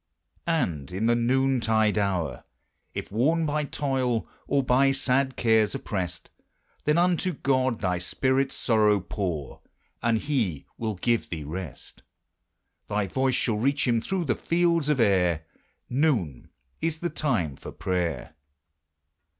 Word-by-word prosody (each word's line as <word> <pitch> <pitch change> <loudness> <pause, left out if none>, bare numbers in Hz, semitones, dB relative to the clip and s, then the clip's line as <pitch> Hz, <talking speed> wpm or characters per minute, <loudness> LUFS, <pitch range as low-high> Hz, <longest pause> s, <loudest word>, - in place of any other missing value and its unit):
And 90 - -1
in 95 +5 -1
the 120 - +4
noontide 120 -3 +2
hour, 95 -7 -1 0.5
If - - -5
worn 155 +10 +2
by 150 0 0
toil, 130 -5 -1 0.2
or 140 -1 +2
by 130 +2 +4
sad 135 0 +1
cares 110 -3 +3
oppressed, 90 -4 -4 0.5
Then 150 +2 +3
unto 180 +1 +2
God 130 -4 0
thy 90 -3 0
spirit's 130 +9 0
sorrow 105 -3 +3
pour, 90 -7 -4 0.4
And 115 -1 +2
he 110 - -1
will 110 -2 -3
give 115 +4 0
thee 80 -3 -4
rest: 80 -1 -7 0.9
Thy 105 -1 0
voice 130 +7 0
shall 120 -5 +1
reach 140 +5 +1
him 115 -2 +2
through 190 +3 -2
the 125 - +2
fields 170 -3 +1
of 150 -3 +2
air: 90 -7 +2 0.4
Noon 120 - 0 0.3
is 165 -1 0
the 175 - -1
time 105 - 0
for - - -9
prayer! 85 -7 -2
115 Hz, 135 wpm, -26 LUFS, 95-135 Hz, 0.9 s, the